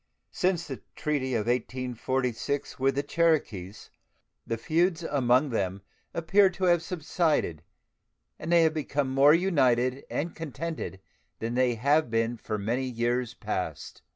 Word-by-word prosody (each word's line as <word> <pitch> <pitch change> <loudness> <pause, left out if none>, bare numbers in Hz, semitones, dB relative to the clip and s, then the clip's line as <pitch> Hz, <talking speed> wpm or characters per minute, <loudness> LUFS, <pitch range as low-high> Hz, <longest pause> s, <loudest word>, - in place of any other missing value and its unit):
Since 180 -3 0
the 135 -3 -7
treaty 140 -5 -1
of 105 -2 0
1846 125 +2 -2
with 135 +1 +2
the 140 - 0
Cherokees 130 - 0 0.6
the 115 - -1
feuds 170 +6 +1
among 130 -2 +2
them 95 -3 -2 0.3
appear 190 +4 +4
to 185 +1 -7
have 175 -2 +4
subsided, 160 - 0 0.8
and 160 - -4
they 170 -1 +6
have 160 -1 +3
become 145 -3 -1
more 140 +3 +6
united 130 -7 +2
and 165 +3 -2
contented 160 - -5 0.4
than 115 +1 -3
they 125 -1 +2
have 140 +4 +2
been 115 +1 0
for 110 0 -4
many 115 +6 -1
years 120 -1 -1
past. - - -4
135 Hz, 135 wpm, -28 LUFS, 120-160 Hz, 0.8 s, they